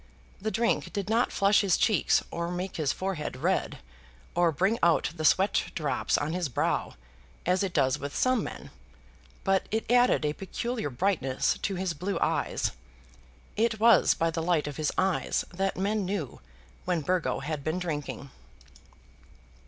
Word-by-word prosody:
The 220 - -1
drink 230 +2 0
did 200 0 -3
not 230 +2 +2
flush 200 +1 +4
his 195 -3 +2
cheeks 215 -6 +3
or 170 0 -3
make 180 +1 -4
his 150 -4 +1
forehead 185 -5 -3
red, - - 0 0.6
or 175 -1 +3
bring 190 +9 +1
out 165 -3 +3
the 155 - -5
sweat 190 +6 +3
drops 150 -4 0
on 150 +2 -2
his 175 -4 -1
brow, 120 - -1 0.5
as 180 +1 +2
it 195 -2 -1
does 140 -3 +1
with 140 0 -6
some 255 -1 +2
men; - - -8 0.7
but 195 -1 +1
it 220 +1 -1
added 245 -9 +4
a 150 - 0
peculiar 220 +1 -4
brightness 135 -3 0
to 195 - -2
his 185 -1 -2
blue 185 +6 -3
eyes. - - 0 0.8
It 220 0 +1
was 230 +1 +5
by 165 0 +1
the 165 0 -2
light 165 -2 +1
of 145 -2 -6
his 155 - 0
eyes 190 -1 +1
that 195 +2 -1
men 205 +2 0
knew 185 -7 -4 0.4
when 175 -3 0
Burgo 180 0 0
had 150 0 -4
been 155 +4 -1
drinking. 150 -5 -4
180 Hz, 160 wpm, -28 LUFS, 155-200 Hz, 0.8 s, was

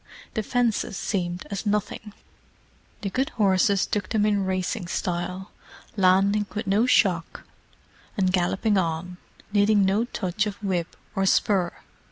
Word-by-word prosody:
The 220 - -1
fences 230 -3 0
seemed 180 -3 -2
as 200 - -3
nothing; 210 0 -2 0.9
the 195 - -3
good 265 +5 0
horses 195 -1 +3
took 205 -3 -2
them 215 -2 +2
in 205 -2 +1
racing 185 0 -2
style, 180 +2 -3 0.4
landing 200 +2 +3
with 215 +2 -2
no 205 +5 +2
shock, 180 -9 +2 0.7
and 185 -2 +2
galloping 190 +3 +2
on, 175 +1 -3 0.4
needing 205 -1 +4
no 200 +5 +2
touch 195 -2 -2
of 205 - -4
whip 180 -4 -2 0.2
or 195 0 +1
spur. 190 -3 +2
195 Hz, 135 wpm, -25 LUFS, 185-210 Hz, 0.9 s, needing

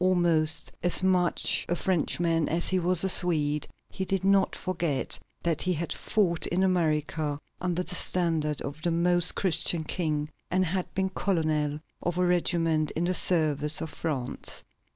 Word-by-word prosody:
Almost 170 -4 +3
as 175 +1 +2
much 180 -2 +2
a 175 - +1
Frenchman 165 -2 0
as 170 +2 +1
he 185 - +1
was 180 0 +4
a - - +1
Swede, 150 -5 +4 0.2
he 190 - -4
did 190 0 -2
not 195 0 +2
forget 170 -7 -2 0.2
that 165 -3 -1
he 185 - 0
had 170 +1 -3
fought 180 -6 0
in 180 +2 0
America 155 -5 -1 0.2
under 180 0 -1
the 180 - -5
standard 165 -5 -1
of 140 +2 -7
the 175 - -1
Most 175 +1 +3
Christian 175 -3 +1
King, 155 -2 -2 0.2
and 185 0 +1
had 185 +2 -3
been 190 0 0
colonel 155 -6 -1 0.2
of 175 0 -3
a 180 - +2
regiment 165 -3 0
in 165 - -1
the 180 +1 0
service 155 -4 +2
of 160 - -6
France. 135 -6 -4
170 Hz, 160 wpm, -27 LUFS, 155-180 Hz, 0.2 s, was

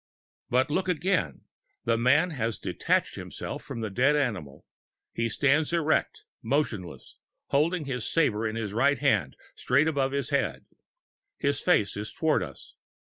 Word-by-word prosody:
But 130 +3 +2
look 185 +4 0
again 170 - 0 0.4
the 115 - +3
man 145 +9 +3
has 115 -6 -2
detached - - 0
himself - - -6
from 115 - -7
the 110 -2 -3
dead 135 +8 +3
animal. 100 - -2 0.5
He 115 0 -1
stands 145 +7 +2
erect, 160 -2 +1 0.2
motionless, 110 - -2 0.3
holding 155 +3 +1
his 125 -4 -3
sabre 115 -9 +2
in 110 - -4
his 110 -3 -3
right 135 +5 +3
hand 110 - +1 0.2
straight 140 +5 +2
above 140 -4 +1
his 140 -1 -2
head. 140 -1 -1 0.7
His 140 -1 0
face 105 - +2
is 105 +1 -5
toward 160 -7 +1
us. 70 -7 -9
135 Hz, 145 wpm, -27 LUFS, 110-150 Hz, 0.7 s, the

